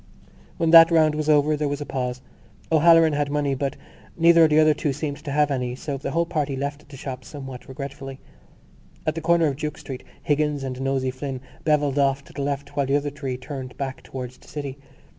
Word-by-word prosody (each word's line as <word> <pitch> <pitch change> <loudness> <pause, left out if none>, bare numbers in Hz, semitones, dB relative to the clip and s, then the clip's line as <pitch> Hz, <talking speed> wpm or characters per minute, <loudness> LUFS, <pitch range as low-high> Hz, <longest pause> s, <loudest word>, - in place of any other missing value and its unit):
When 165 -2 +1
that 165 0 +10
round 160 -2 +4
was 155 0 -2
over 150 0 +4
there 150 0 -1
was 145 0 -2
a 145 - -5
pause. 125 -2 -3 0.5
O'Halloran 165 0 +6
had 145 0 0
money 145 -1 0
but 135 +1 -2 0.4
neither 165 0 +6
of - - +2
the 150 - +3
other 155 0 +6
two 145 -1 -1
seemed 145 +1 -4
to 150 0 -8
have 150 0 +2
any; 125 -2 -2
so 140 +2 -4
the 135 - -4
whole 170 +1 +1
party 150 -4 -2
left 140 +2 -5
the 140 - -10
shop 130 -1 -6
somewhat 135 -3 -9
regretfully. 135 0 -7 0.9
At 155 - +1
the 165 - -5
corner 170 +1 +3
of 140 -3 0
Duke 150 0 -4
Street 130 -2 -8 0.2
Higgins 150 -1 0
and 130 -1 -4
Nosey 135 -1 0
Flynn 130 0 -5 0.3
bevelled 145 -2 +2
off 140 0 +2
to - - -17
the 140 - -4
left 140 0 -3
while 140 -2 +1
the 135 - +2
other 145 0 0
three 135 -3 -4
turned 130 -1 -7
back 135 -2 -4
towards 130 -1 -8
the - - -20
city. 140 -2 -6
145 Hz, 215 wpm, -24 LUFS, 135-150 Hz, 0.9 s, that